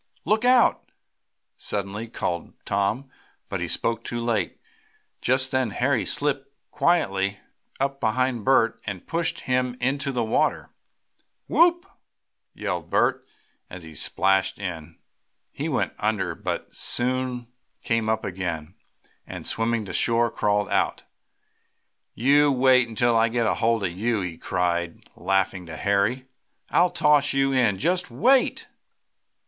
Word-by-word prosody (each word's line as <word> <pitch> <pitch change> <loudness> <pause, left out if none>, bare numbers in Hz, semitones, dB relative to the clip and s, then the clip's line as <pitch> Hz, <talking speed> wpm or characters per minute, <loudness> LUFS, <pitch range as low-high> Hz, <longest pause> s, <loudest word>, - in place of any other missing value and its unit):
"Look 215 +5 +2
out!" 250 -1 +3 0.7
suddenly 100 +2 -4
called 85 -6 -4
Tom, 100 +7 -1 0.4
but - - -3
he - - -2
spoke 115 0 -1
too 120 - -4
late. 115 -3 -1 0.6
Just 130 +1 +1
then 130 -3 +1
Harry 125 +3 0
slipped 140 -2 0 0.2
quietly 100 - +1 0.4
up 135 0 -1
behind 125 0 0
Bert 130 -3 +3
and 95 -4 -5
pushed 170 0 -2
him 125 -1 -1
into 140 +2 0
the 125 -3 -1
water. 110 - 0 0.8
"Whoop!" 345 +1 +4 0.7
yelled - - -4
Bert, - - +1 0.4
as 90 -1 -9
he 80 -1 -11
splashed 95 +5 +1
in. 85 -6 -6 0.5
He - - -4
went - - -1
under, - - 0
but - - -5
soon 125 0 -1 0.4
came 115 -1 0
up 110 0 0
again, 85 -5 -4 0.5
and, - - -8
swimming 115 -1 -1
to - - -7
shore, 115 0 +2
crawled 105 0 0
out. - - 0 1.1
"You 145 +4 +4
wait 130 -1 +4
until 115 +1 +1
I 115 0 +4
get 120 0 0
hold 115 -1 +1
of 90 - 0
you!" 110 +4 -1
he 85 -3 -5
cried 85 -2 -2
laughingly 95 -2 -1
to 80 - -7
Harry. 100 +8 +1 0.5
"I'll 180 +1 +4
toss 150 -4 +3
you 135 0 +2
in! 115 -7 +2
Just 180 - 0
wait!" 260 +3 +2
115 Hz, 130 wpm, -24 LUFS, 100-135 Hz, 1.1 s, Whoop